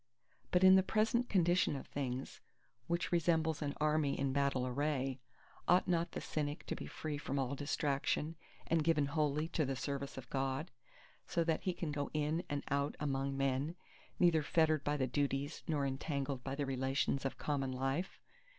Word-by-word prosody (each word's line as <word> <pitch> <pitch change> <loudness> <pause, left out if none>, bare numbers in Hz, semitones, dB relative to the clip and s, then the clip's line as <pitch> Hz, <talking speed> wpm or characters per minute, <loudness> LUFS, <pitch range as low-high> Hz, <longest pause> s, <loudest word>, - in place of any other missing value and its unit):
But 180 +1 +3
in 190 0 +9
the - - +6
present 225 +5 +1
condition 175 -4 +3
of 135 - -6
things, 130 -2 -4 0.5
which 170 +1 -1
resembles 160 -2 +2
an 145 -1 -2
Army 150 -2 +2
in 135 -1 0
battle 140 -2 +1
array, 135 0 -1 0.5
ought 180 +2 +5
not 170 -1 +1
the - - -3
Cynic 150 -1 -3
to - - -3
be - - -7
free 150 -2 -4
from 140 -1 -3
all 135 0 0
distraction 145 +2 -1 0.3
and 165 -1 +2
given 150 -2 +3
wholly 150 +1 0
to 165 - +1
the 135 -1 -1
service 140 +1 -4
of 130 -2 -7
God, 135 +4 -1 0.6
so 170 - +1
that 160 -1 0
he 185 - +1
can 170 -3 -3
go 145 -1 -2
in 155 +3 0
and 145 -1 -2
out 140 +1 0
among 135 -2 -1
men, 135 +4 0 0.4
neither 170 -3 +5
fettered 155 0 +2
by 145 0 0
the 130 - +1
duties 140 +3 -1
nor 145 -3 +1
entangled 135 -1 -2
by 135 0 -3
the 145 0 -1
relations 135 +1 0
of 135 - -2
common 135 -3 -1
life? 135 +7 -2
145 Hz, 180 wpm, -36 LUFS, 135-160 Hz, 0.6 s, in